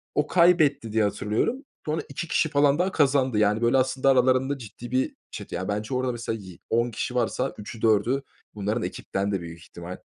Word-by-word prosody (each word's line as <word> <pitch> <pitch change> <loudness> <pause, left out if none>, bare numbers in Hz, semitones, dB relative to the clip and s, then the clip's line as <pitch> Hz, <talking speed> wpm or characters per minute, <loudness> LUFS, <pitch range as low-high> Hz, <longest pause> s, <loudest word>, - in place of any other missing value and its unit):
o 150 0 +2
kaybetti 160 -10 +3
diye 110 -1 +2
hatırlıyorum. 105 - -1 0.2
Sonra 155 +1 -1
2 150 +4 -5
kişi 155 - +1
falan 145 +2 +3
daha 185 +1 +1
kazandı; 135 -5 +2
yani, 105 +1 +2
böyle 120 +3 +3
aslında 130 +1 +2
aralarında 130 +2 +3
ciddi 120 +1 -10
bir 130 +1 0 0.2
çete. - - -7
Ya, 95 - -3
bence 105 +4 -3
orada, 130 0 0
mesela, 115 -1 -4
yi 95 -3 -12
10 120 +1 +1
kişi 125 +3 -4
varsa 125 - 0
3’ü 105 +2 -9
4’ü 115 +5 +2 0.3
bunların 105 +3 -1
ekipten, 100 +1 -3
de 95 -3 -1
büyük 85 0 -9
ihtimal. 85 +2 -9
120 Hz, 190 wpm, -25 LUFS, 105-140 Hz, 0.3 s, kaybetti